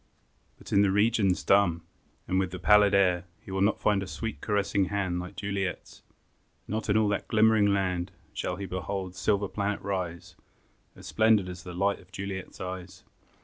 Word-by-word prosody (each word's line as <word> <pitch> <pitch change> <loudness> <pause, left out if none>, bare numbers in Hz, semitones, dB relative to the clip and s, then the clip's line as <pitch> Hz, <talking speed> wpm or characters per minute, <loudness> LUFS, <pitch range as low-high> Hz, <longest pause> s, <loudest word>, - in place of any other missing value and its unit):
But - - -9
in 100 - +6
the 100 - +4
regions 105 -2 +2
dumb, 90 -4 +3 0.4
And 95 +1 +2
in 95 - -2
the 90 - -6
pallid 105 +2 +5
air, 90 -2 +3
He - - -12
will 95 0 -1
not 105 +3 +2
find 105 -2 +2
a 95 - -5
sweet, 115 +3 -5
caressing 100 -2 +1
hand 95 -2 -1
Like 90 +2 -7
Juliet's; 95 -1 -4 0.7
not 110 +1 -3
in 105 - +4
all 110 -1 +3
that 100 - -2
glimmering 110 -1 +4
land 90 -3 0 0.2
Shall - - -3
he 100 - -5
behold 95 0 -4
a - - -20
silver 100 +2 +1
planet 100 +1 -2
rise 90 -4 -4 0.6
As - - -13
splendid 110 -3 +3
as 90 0 -7
the 90 -2 -9
light 100 +2 +1
of 90 - -20
Juliet's 95 0 -6
eyes. 95 0 -7
100 Hz, 185 wpm, -28 LUFS, 90-100 Hz, 0.7 s, in